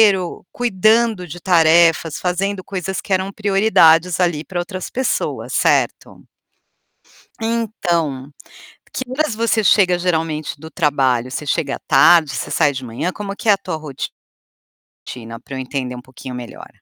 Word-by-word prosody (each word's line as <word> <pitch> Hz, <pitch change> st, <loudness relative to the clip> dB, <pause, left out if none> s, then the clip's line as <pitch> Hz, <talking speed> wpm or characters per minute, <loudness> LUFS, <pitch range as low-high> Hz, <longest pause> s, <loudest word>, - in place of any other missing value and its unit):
ro 180 Hz, -2 st, -5 dB
cuidando 220 Hz, -3 st, +2 dB
de 175 Hz, +4 st, -8 dB
tarefas, 165 Hz, -2 st, +3 dB
fazendo 185 Hz, +2 st, -2 dB
coisas 190 Hz, 0 st, -4 dB
que 195 Hz, -, -3 dB
eram 190 Hz, +1 st, 0 dB
prioridades, 195 Hz, -5 st, +3 dB
ali, 170 Hz, -4 st, +1 dB
pra 180 Hz, +1 st, -7 dB
outras 185 Hz, +1 st, -5 dB
pessoas, 260 Hz, +1 st, -2 dB
certo? -, -, 0 dB, 1.2 s
Então, 175 Hz, -, -2 dB, 0.6 s
que 260 Hz, -, -4 dB
horas 270 Hz, -3 st, -1 dB
você 225 Hz, -1 st, +1 dB
chega, 180 Hz, -2 st, +4 dB
geralmente, 160 Hz, -4 st, -2 dB
do 160 Hz, +2 st, -11 dB
trabalho? 135 Hz, -7 st, +1 dB
Você 145 Hz, +3 st, -5 dB
chega 140 Hz, -1 st, -1 dB
à -, -, -9 dB
tarde, 155 Hz, +2 st, +5 dB
você -, -, -4 dB
sai 145 Hz, -, +2 dB
de 130 Hz, -1 st, -6 dB
manhã, 125 Hz, +10 st, -3 dB
como 200 Hz, -1 st, -6 dB
que 225 Hz, -, -5 dB
é -, -, +8 dB
a -, -, +4 dB
tua 160 Hz, -, -5 dB
ro 155 Hz, -2 st, -8 dB, 1.2 s
tina 115 Hz, -2 st, -8 dB
pra 135 Hz, +2 st, -9 dB
eu -, -, -4 dB
entender 130 Hz, -1 st, -4 dB
um 125 Hz, -, -8 dB
pouquinho 130 Hz, 0 st, -10 dB
melhor? 120 Hz, -1 st, -9 dB
175 Hz, 155 wpm, -19 LUFS, 145-195 Hz, 1.2 s, é